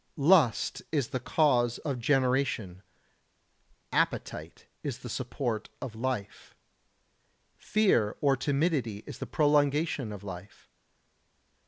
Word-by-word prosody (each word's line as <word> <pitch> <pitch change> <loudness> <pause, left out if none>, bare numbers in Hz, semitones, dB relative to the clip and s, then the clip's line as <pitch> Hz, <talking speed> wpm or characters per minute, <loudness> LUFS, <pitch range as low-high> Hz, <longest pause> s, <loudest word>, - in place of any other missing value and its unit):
84. 140 - -4
Lust 160 - +4
is 145 -6 +1
the 130 - -2
cause 125 -3 +2
of 140 -5 -3
generation. 125 -7 +1 1.1
Appetite - - -2 0.2
is 140 -5 -4
the 120 - -9
support 120 -3 -3
of 120 - -6
life. 115 -3 -4 1.0
Fear 185 - +2
or 140 -2 +3
timidity 135 - 0
is - - -9
the - - -5
prolongation 145 -3 +2
of 100 -1 -8
life. 95 0 -10
130 Hz, 110 wpm, -29 LUFS, 110-145 Hz, 1.1 s, Lust